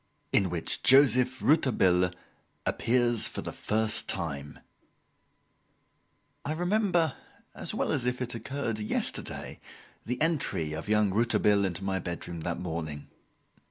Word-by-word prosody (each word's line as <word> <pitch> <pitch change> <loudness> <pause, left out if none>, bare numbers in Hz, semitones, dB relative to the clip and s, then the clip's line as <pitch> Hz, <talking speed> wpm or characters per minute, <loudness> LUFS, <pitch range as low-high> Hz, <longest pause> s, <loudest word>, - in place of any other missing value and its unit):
In 95 -2 +3
Which 85 -1 -1
Joseph 130 -1 +5
Rouletabille 95 - +3 0.6
Appears 120 -1 +2
for - - -6
the - - -4
First 110 0 0
Time 75 -6 -3 1.9
I 150 - -2
remember 175 -3 +1 0.4
as - - 0
well - - 0
as 125 -4 -1
if 125 0 -1
it 125 -1 -3
had 115 - -6
occurred 115 -3 -3
yesterday, 105 - -3 0.5
the 125 +2 -2
entry 145 - 0
of 80 +6 -6
young 105 -2 +3
Rouletabille 105 -2 +2
into 95 0 -3
my 95 -1 -1
bedroom 85 -1 -5
that 85 +1 -3
morning. 80 -4 -5
110 Hz, 125 wpm, -29 LUFS, 90-130 Hz, 1.9 s, Joseph